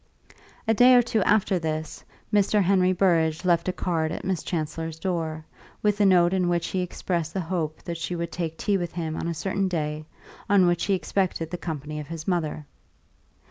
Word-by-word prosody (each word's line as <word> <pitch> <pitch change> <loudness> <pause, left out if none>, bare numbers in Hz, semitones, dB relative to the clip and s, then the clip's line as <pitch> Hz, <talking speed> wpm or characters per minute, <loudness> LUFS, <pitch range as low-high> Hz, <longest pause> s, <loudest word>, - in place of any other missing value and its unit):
A 225 - +4
day 250 +3 +7
or 245 - +6
two 230 -2 0
after 195 -2 +2
this, 155 -1 -4 0.3
Mr. 205 0 +3
Henry 185 0 +3
Burrage 170 -3 +2
left 175 -1 +2
a - - +2
card 165 -3 -1
at - - -5
Miss 185 -4 -1
Chancellor's 160 -1 -3
door, 160 -3 -3 0.4
with 210 0 +2
a 200 - +6
note 175 -1 +5
in 180 -2 +1
which 170 -1 0
he 190 - -1
expressed 170 -2 -3
the - - 0
hope 165 -3 -3
that 170 -1 -4
she 170 +2 -3
would 170 -1 -3
take 165 -2 -4
tea 200 -2 +1
with 175 -1 -4
him 160 -2 -3
on - - -3
a 170 - -2
certain 195 +3 -1
day 155 -3 -3 0.4
on 200 -2 +5
which 175 -1 +1
he 200 - +2
expected 180 -3 -1
the 180 - -3
company 150 -2 -5
of 150 - -7
his 165 -1 -7
mother. 155 -4 -1
175 Hz, 200 wpm, -25 LUFS, 160-190 Hz, 0.4 s, day